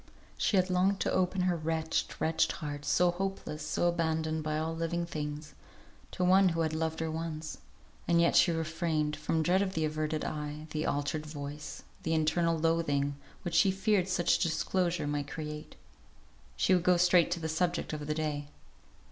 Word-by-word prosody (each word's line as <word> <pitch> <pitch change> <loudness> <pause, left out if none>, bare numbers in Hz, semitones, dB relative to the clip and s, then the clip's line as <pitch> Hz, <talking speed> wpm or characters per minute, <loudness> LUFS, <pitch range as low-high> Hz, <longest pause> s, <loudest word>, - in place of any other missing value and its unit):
For - - -27
she 195 -3 +4
longed 185 +2 +1
to - - +1
open 185 0 +1
her 180 -1 +2
wretched, 160 0 -2
wretched 160 0 +2
heart, 145 -2 -6
so 175 +4 +3
hopeless, 180 -4 -4
so 155 +3 0
abandoned 160 -2 0
by 155 0 -1
all 160 +1 -2
living 170 +1 -1
things, 150 -2 -5 0.6
to 180 - -3
one 190 +1 +6
who 165 -1 -1
had 160 -1 0
loved 160 0 -2
her 160 -1 -1
once; 160 -1 -5 0.5
and 170 0 +4
yet 170 - +3
she 175 - +6
refrained, 160 -2 -1
from 155 +1 0
dread 180 +4 +3
of 190 -1 -2
the 160 -1 +1
averted 155 0 -2
eye, 150 0 -4
the 155 0 -1
altered 150 +2 -1
voice, 145 0 -7 0.2
the 160 0 0
internal 165 +1 +2
loathing, 155 -3 +1 0.3
which 175 - -4
she 190 +4 +5
feared 190 0 +1
such 180 -2 +2
disclosure 170 0 0
might 145 -1 -2
create. 150 -1 -6 0.8
She 185 - +3
would 180 - +4
go 180 -1 +4
straight 180 -1 +5
to 175 - -4
the 160 - -3
subject 170 +1 -1
of 150 -1 -5
the 150 - -1
day. 150 -2 -2
160 Hz, 180 wpm, -31 LUFS, 155-175 Hz, 0.8 s, one